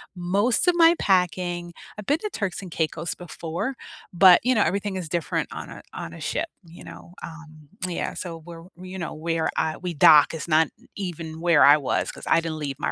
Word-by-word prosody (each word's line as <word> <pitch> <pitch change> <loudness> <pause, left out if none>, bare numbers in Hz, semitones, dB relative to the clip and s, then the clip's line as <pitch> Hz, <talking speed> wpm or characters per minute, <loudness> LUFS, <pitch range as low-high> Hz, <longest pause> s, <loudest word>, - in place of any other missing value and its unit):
most 200 - +1
of 355 - +2
my 335 0 +6
packing. 175 -2 0 0.3
I've 210 - -8
been 290 +8 +1
to 425 - -4
Turks 195 -2 -3
and 185 -3 -10
Caicos 160 +1 -2
before, 175 +8 -5 0.4
but, 180 0 +7
you 255 +2 +2
know, 215 - +3
everything 200 0 -1
is 180 -4 -5
different 170 0 -2
on - - -7
a - - -10
on - - -7
a - - -11
ship, - - -2 0.2
you 165 +1 -14
know? 175 - -12
Um, 155 -2 -11 0.2
yeah. 175 - -3
So 170 -3 -6
where 165 0 -11 0.2
you 185 +1 -8
know, 175 - -5
where 165 +1 -2
I 155 - 0
we 180 -1 -5
dock 150 +1 +6
is 160 +1 -6
not 160 -1 +3 0.3
even 165 -4 -6
where 170 -4 +5
I 145 +1 +8
was, 140 - -1
'cause - - -12
I - - +4
didn't 165 -1 -5
leave 140 -2 -5
my - - -1
175 Hz, 210 wpm, -24 LUFS, 160-190 Hz, 0.4 s, I